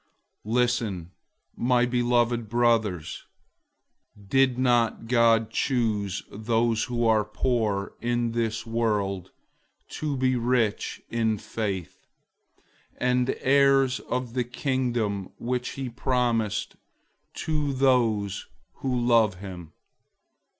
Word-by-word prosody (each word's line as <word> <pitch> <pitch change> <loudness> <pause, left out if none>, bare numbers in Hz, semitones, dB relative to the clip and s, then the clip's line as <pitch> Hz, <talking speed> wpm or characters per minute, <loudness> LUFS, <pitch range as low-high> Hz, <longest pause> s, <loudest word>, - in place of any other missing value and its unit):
002:005 110 - -2
Listen, 115 -8 0 0.4
my 125 0 +2
beloved 120 -2 +1
brothers. 110 -8 +1 1.1
Didn't 125 -3 +2
God 115 -2 +3
choose 110 -7 0
those 115 +1 0
who 120 -1 -1
are 110 -2 +4
poor 105 -2 -1
in 120 0 0
this 115 0 -2
world 105 -5 -1 0.6
to 150 -3 -3
be 130 0 +2
rich 120 -3 0
in 110 -2 +1
faith, 105 -4 -5 0.9
and 125 0 +1
heirs 135 -1 +4
of 125 -2 -4
the 125 -1 0
Kingdom 120 -6 -2
which 125 +1 -3
he 135 -1 -4
promised 120 -3 -1 0.6
to 150 -2 -1
those 115 -7 +1 0.3
who 130 -2 -1
love 115 -4 +3
him? 90 -4 -9
120 Hz, 95 wpm, -26 LUFS, 110-125 Hz, 1.1 s, are